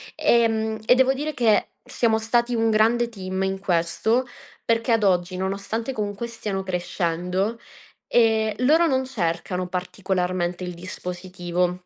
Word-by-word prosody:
Ehm, 220 -2 +2
e 250 - +6
devo 260 +1 +4
dire 295 +3 -3
che 225 -5 +3 0.2
siamo 235 -3 +1
stati 235 +2 +1
un 225 0 +2
grande 225 +2 +3
team 190 -3 -4
in 190 0 -1
questo, 190 +7 +1 0.4
perché 230 +1 +1
ad 225 -2 +3
oggi, 180 -1 +1
nonostante 200 +6 -3
comunque 210 0 -3
stiano 210 -4 -4
crescendo, 180 +3 -2 0.5
ehm, 220 -2 +3
loro 315 +7 +4
non 265 -2 +1
cercano 180 -5 -2
particolarmente 180 -1 -2
il 180 0 -4
dispositivo. 180 0 -3
205 Hz, 130 wpm, -24 LUFS, 180-230 Hz, 0.5 s, e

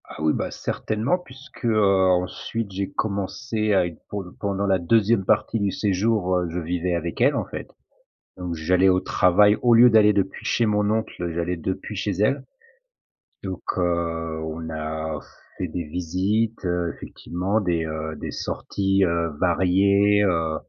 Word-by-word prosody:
Ah - - -10
oui 80 0 +2
bah, - - -3
certainement 110 +11 -1
puisque, 135 -5 -12
heu, 110 -2 +3 0.3
ensuite 95 +4 -1
j'ai 95 +1 -3
commencé 110 +2 -2
à 95 - +4
être 85 -3 -8
pour 100 -1 -4
le 90 - -12
pendant 100 0 -2
la 95 -2 +2
2e 105 +3 +2
partie 115 - +1
du 100 -1 0
séjour, 100 -1 +1
heu, 90 - -2
je 85 +2 -3
vivais 90 +1 -1
avec 85 +5 -4
elle 135 +3 +4
en - - -1
fait. - - -7 0.7
Donc 90 -2 -4
j'allais 90 +4 +3
au 90 0 +4
travail 100 +3 +4
au 120 -1 +4
lieu 120 +2 +8
d'aller 105 -2 +5
depuis 95 -1 -2
chez 120 - +2
mon 105 -1 +1
oncle, 110 -6 -2
j'allais 85 +1 -2
depuis 95 +5 -4
chez 100 +1 -1
elle. 105 +9 +1 1.0
Donc 95 -2 -5
heu, 85 -2 -1
on 80 +1 -5
a 80 0 -4 0.4
fait - - -2
des 85 - -4
visites, 95 +8 -1
heu, 85 -1 -1
effectivement 95 +5 -3
des, 85 -4 0
heu, 80 0 -4
des - - -5
sorties, 95 0 -1
heu, 85 -1 0
variées, 100 +3 +3
heu, 80 -4 +1
95 Hz, 165 wpm, -23 LUFS, 85-105 Hz, 1.0 s, lieu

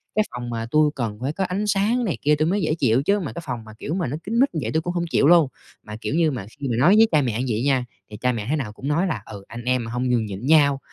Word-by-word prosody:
cái 215 - +4
phòng 120 0 -6
mà 115 -1 -3
tui 155 0 +4
cần 115 -5 -3
phải 135 +4 -2
có 190 - -2
ánh 195 +3 -2
sáng 210 +5 +1
này 180 - -2
kia 150 +1 +3
tui 155 +1 0
mới 200 +4 +1
dễ 155 -2 0
chịu, 130 -5 +2
chứ 200 +5 +2
mà 185 - -5
cái 170 - -6
phòng 125 -5 -4
mà, 110 0 -12
kiểu, 155 - -4
mà 180 -6 -1
nó 145 +5 -3
kín 230 +4 -1
mít 275 +2 +4
như - - 0
vậy 110 - -2
tui 160 - +1
cũng 175 +2 -3
hông 170 -1 -1
chịu 140 - +3
luôn. 170 -3 +6 0.4
Mà, 105 - -8
kiểu 145 - -2
như, 165 -3 +3
mà 115 -7 -5
khi 140 - -3
mà 120 - 0
nói 175 +9 +6
với 225 +1 +7
cha 155 -3 +4
mẹ 120 -4 -1
như 130 - -1
vậy 115 - -2
nha, 130 -3 +2 0.2
thì 105 - -9
cha 125 0 +1
mẹ 110 -4 -4
thế 155 - +2
nào 120 -8 -4
cũng 130 - -7
nói 165 +6 +1
là 120 - -3
"Ừ, 100 -2 -9
anh 120 +1 -8
em 125 -1 +1
mà 115 - -6
hông 125 +1 -1
nhường 120 -3 +1
nhịn 100 +3 -6
nhau, 140 -2 +4
140 Hz, 335 wpm, -23 LUFS, 120-170 Hz, 0.4 s, với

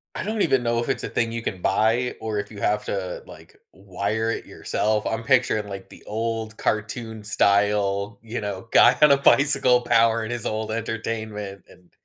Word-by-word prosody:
I - - -3
don't 215 +2 -1
even 135 -8 +2
know 120 0 0
if 120 - -3
it's - - -1
a - - -4
thing 115 -1 0
you 115 0 -5
can 95 -5 -4
buy, 115 +6 +1
or 110 -2 -3
if 100 - -5
you 105 - -10
have 105 +1 0
to 95 -2 -4
like - - -15
w 95 0 -21
wire 110 +4 -1
it - - -5
yourself, 105 0 -2
I'm 115 +1 -2
picturing 110 -4 +1
like 95 -1 -9
the - - -15
old 110 0 -3
cartoon 110 +1 -3
style, 100 0 +1
you 115 +2 -5
know, 100 +1 -6
guy 125 - +6
on 150 - +7
a 140 - +6
bicycle 140 -3 +5
powering 115 -1 +2
his 120 -2 -1
old 110 0 -3
entertainment 110 -3 -5
and 90 -1 -21
110 Hz, 195 wpm, -23 LUFS, 105-115 Hz, -, on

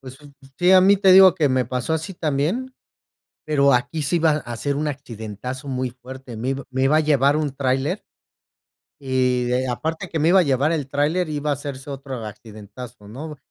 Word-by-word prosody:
Pues, 130 0 -12
un 145 - -14
un 135 0 -18
sí, 180 +1 +4
a 190 - +8
mí, 195 +2 +5
te 190 -1 +5
digo, 190 -2 +8
que 155 -6 +1
me 130 -1 +1
pasó 125 +5 -3
así 160 +4 -4
también, 170 - -2 0.7
pero 140 -2 +3
aquí 125 +6 0
sí 155 +5 +1
iba 160 -1 +3
a 135 -6 -3
ser 140 +5 -2
un 150 +2 -2
accidentazo 125 -1 -7
muy 130 -1 -2
fuerte. 125 -1 -11
Me 120 +4 -3
ib 135 0 -3
me 130 0 -1
iba 145 +3 +4
a - - +4
llevar 145 -2 +3
un 150 -3 -2
tráiler. 135 +7 -1 1.0
Y 125 -2 0
aparte 160 +8 -3
que 160 - -2
me 155 - +3
iba 190 +2 +6
a 180 - +4
llevar 140 +1 +1
el 150 -5 -2
tráiler, 155 +5 0
iba 150 0 -3
a 145 - +3
hacerse 140 0 -7
otro 135 -4 -6
accidentazo, 105 +1 -11
¿no? 150 +8 -8
140 Hz, 205 wpm, -22 LUFS, 130-155 Hz, 1.0 s, a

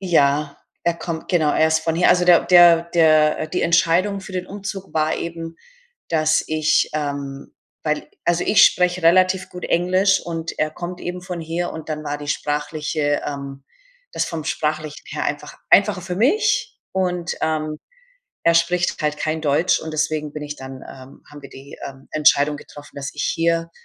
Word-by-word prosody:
Ja, 145 -5 +1 0.3
er 170 - +2
kommt 165 -1 -6
genau, 160 -5 +2
er 160 - +3
ist 160 0 +2
von 165 0 -1
hier. 175 +2 +3
Also, 180 0 +4
der 175 -1 +6
der 175 -2 +7
der 155 -2 +3
die 180 +3 -2
Entscheidung 180 +4 +2
für 195 - -11
den 185 0 -4
Umzug 195 -1 -7
war 155 0 +1
eben, 165 -1 -6 0.5
dass 155 -1 +2
ich 155 0 +1
ähm, 140 -2 -5 0.3
weil 150 0 -2 0.2
also, 175 0 +1
ich 210 - +6
spreche 180 -1 +2
relativ 185 +2 +3
gut 180 - -9
Englisch, 185 +3 +2
und 165 -1 -5
er 155 0 0
kommt 175 +3 -7
eben 180 +1 -5
von 180 -2 -6
hier, 165 +2 -3
und 160 0 -9
dann 155 -1 -4
war 145 0 -3
die 145 0 -8
sprachliche 150 0 -1
ähm, 140 -1 -6 0.5
das - - -1
vom 160 -2 -5
Sprachlichen 155 -1 -3
her - - -4
einfach - - -4
einfacher 180 - +4
für 180 0 -5
mich 425 - +1
und, 180 -2 -1
ähm, 155 -1 -2 0.7
er 170 - +4
spricht 175 +1 +1
halt 150 -1 -1
kein 155 0 -2
Deutsch, 155 +4 +2
und 160 - -6
deswegen 155 -1 -2
bin 150 - -6
ich 150 0 -6
dann 130 0 -9
ähm, 130 +1 -13
haben 145 -1 -12
wir 140 - -11
die, 135 +1 -12
ähm, 135 0 -13
Entscheidung 150 -1 +3
getroffen, 145 0 -13
dass 140 -1 -5
ich 145 - -4
hier 165 0 0
160 Hz, 180 wpm, -21 LUFS, 150-175 Hz, 0.7 s, der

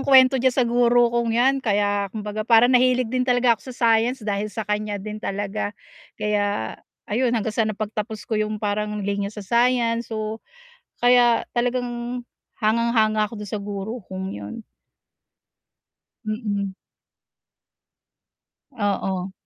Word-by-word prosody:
kuwento 265 -1 +6
diyan 260 0 +2
sa 255 - +3
guro 240 0 +3
kong 235 -1 +1
'yan 260 +3 +4
kaya 205 -3 +1
kumbaga 210 +1 -5
parang 230 +3 +5
nahilig 255 -1 +3
din 255 - +1
talaga 245 -1 +3
ako 230 - -6
sa 255 - -7
science 230 +1 +2
dahil 205 0 -1
sa 220 +1 -5
kaniya 210 0 -2
din 215 +2 -6
talaga. 205 +1 -3 0.4
Kaya 205 - -1 0.3
ayun, 245 +4 0
hanggang 220 -1 -1
sa 220 0 +1
napagtapos 215 0 -4
ko 220 -2 -1
'yung 215 0 -1
parang 210 0 -2
linya 200 0 -1
sa 210 -1 -9
science, 235 +1 +2
so, 220 0 -4 0.6
kaya 245 -1 +5
talagang 245 0 -2 0.3
hangang-hanga 215 -1 +2
ako 225 - -9
do'n 205 - -9
sa 210 - -3
guro 205 +4 -5
kong 190 0 -5
'yon. 100 0 -7 1.7
Mm. 205 -3 -2 2.0
Oo. 195 -4 -2
220 Hz, 135 wpm, -23 LUFS, 205-240 Hz, 2.0 s, kuwento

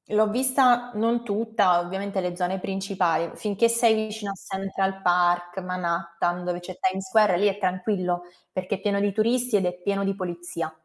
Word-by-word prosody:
l'ho 215 0 +5
vista 250 0 +3
non 230 +2 0
tutta, 210 -4 +2
ovviamente 190 +2 -3
le 180 -1 -3
zone 180 +1 -1
principali. 185 -3 -1
Finché 210 +2 +1
sei 230 -1 +4
vicino 215 -1 -3
a 195 - -6
Central 195 0 -3
Park, 175 0 +2
Manhattan, 175 -1 -2
dove 175 0 -2
c'è 180 +1 -9
Times 190 0 -1
Square, 210 -2 +4
lì 205 - +4
è 200 -1 0
tranquillo 185 -2 -1 0.3
perché 185 +2 -2
è 195 - -11
pieno 200 0 +1
di 205 0 +1
turisti 235 +3 +1
ed 195 -2 +2
è 180 - 0
pieno 200 +1 -1
di 195 - 0
polizia. 175 -3 -4
195 Hz, 175 wpm, -25 LUFS, 180-215 Hz, 0.3 s, l'ho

